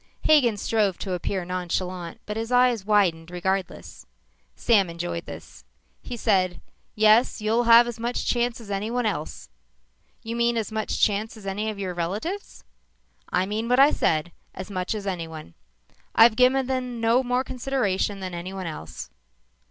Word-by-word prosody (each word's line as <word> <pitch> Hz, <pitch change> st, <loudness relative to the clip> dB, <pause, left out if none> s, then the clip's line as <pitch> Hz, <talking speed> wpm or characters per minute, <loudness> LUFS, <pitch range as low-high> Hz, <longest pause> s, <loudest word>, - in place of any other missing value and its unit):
Hagen 255 Hz, -9 st, +4 dB
strove 205 Hz, -3 st, 0 dB
to 190 Hz, -, -4 dB
appear 180 Hz, +1 st, -2 dB
nonchalant 180 Hz, -1 st, -4 dB
but 210 Hz, -, -5 dB
his 225 Hz, +2 st, -4 dB
eyes 245 Hz, -4 st, +3 dB
widened 180 Hz, -6 st, +2 dB
regardless. 180 Hz, -, -4 dB, 0.5 s
Sam 200 Hz, -6 st, +3 dB
enjoyed 170 Hz, 0 st, -5 dB
this. -, -, -11 dB, 0.4 s
He 245 Hz, -, -7 dB
said, 185 Hz, -6 st, +1 dB, 0.4 s
"Yes, 215 Hz, +3 st, +4 dB
you'll 225 Hz, +3 st, +1 dB
have 235 Hz, +1 st, +8 dB
as 240 Hz, -1 st, -6 dB
much 240 Hz, +2 st, -2 dB
chance 240 Hz, -1 st, 0 dB
as 215 Hz, -3 st, -10 dB
anyone 225 Hz, +5 st, -1 dB
else." 155 Hz, -, -4 dB, 0.7 s
"You 230 Hz, +1 st, -4 dB
mean 235 Hz, 0 st, +1 dB
as 220 Hz, -1 st, -2 dB
much 220 Hz, 0 st, -2 dB
chance 215 Hz, +2 st, +1 dB
as 210 Hz, -, -13 dB
any 205 Hz, +3 st, -2 dB
of 215 Hz, -, -5 dB
your 190 Hz, -2 st, -3 dB
relatives?" 205 Hz, -, -4 dB, 0.7 s
"I 180 Hz, +1 st, +1 dB
mean 215 Hz, +4 st, -3 dB
what 250 Hz, +1 st, +3 dB
I 280 Hz, +2 st, +7 dB
said 160 Hz, +2 st, 0 dB, 0.2 s
as 190 Hz, +2 st, -7 dB
much 185 Hz, +3 st, -2 dB
as 205 Hz, -2 st, -5 dB
anyone. 165 Hz, -, -5 dB, 0.6 s
I've 225 Hz, 0 st, +7 dB
given 255 Hz, +2 st, +4 dB
them 250 Hz, -2 st, -3 dB
no 230 Hz, +2 st, +3 dB
more 250 Hz, 0 st, 0 dB
consideration 235 Hz, -7 st, -1 dB
than 185 Hz, -1 st, -5 dB
anyone 185 Hz, +2 st, -6 dB
else." 80 Hz, -, -7 dB
210 Hz, 160 wpm, -25 LUFS, 185-235 Hz, 0.7 s, have